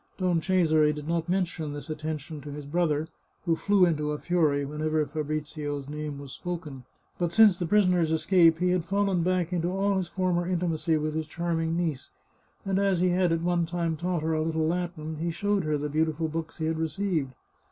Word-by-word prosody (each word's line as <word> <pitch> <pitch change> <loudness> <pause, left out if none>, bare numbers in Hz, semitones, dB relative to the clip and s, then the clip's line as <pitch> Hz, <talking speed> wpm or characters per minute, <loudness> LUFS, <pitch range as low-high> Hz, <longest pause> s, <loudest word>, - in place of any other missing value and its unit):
Don 180 -3 +1
Cesare 160 -4 +3
did 150 0 -6
not 170 0 -1
mention 175 -5 -1
this 145 +2 -7
attention 155 -1 -5
to 145 - -8
his 145 0 -7
brother, 155 0 0 0.4
who 165 -2 +2
flew 200 +1 +4
into 150 -3 0
a - - -3
fury 150 -5 +1
whenever 155 +1 -1
Fabrizio's 150 -1 -4
name 150 -1 -5
was 140 -1 -9
spoken. 150 -6 -6 0.3
But 175 -2 0
since 205 -1 +6
the 175 - -1
prisoner's 180 -4 +3
escape 165 0 +4
he 180 +1 +1
had 180 -2 +1
fallen 195 0 +1
back 180 0 0
into 170 -1 0
all 195 +1 +1
his 185 -2 -1
former 175 -1 0
intimacy 170 -3 0
with 155 0 -2
his 160 0 -2
charming 165 0 -1
niece, 160 -6 -2 0.6
and 195 0 +1
as 195 -3 +2
he 180 +1 +3
had 180 -1 +2
at 165 0 0
one 175 -1 +1
time 170 -1 -1
taught 170 0 -2
her 160 0 0
a 155 - +1
little 160 0 0
Latin, 165 -2 -3
he 170 +2 -2
showed 200 +2 0
her 155 -1 +1
the 145 +1 -2
beau 155 +2 +2
tiful 160 0 -2
books 165 +1 -5
he 160 - -2
had 160 0 -1
received. 160 -3 -1
165 Hz, 205 wpm, -27 LUFS, 155-180 Hz, 0.6 s, since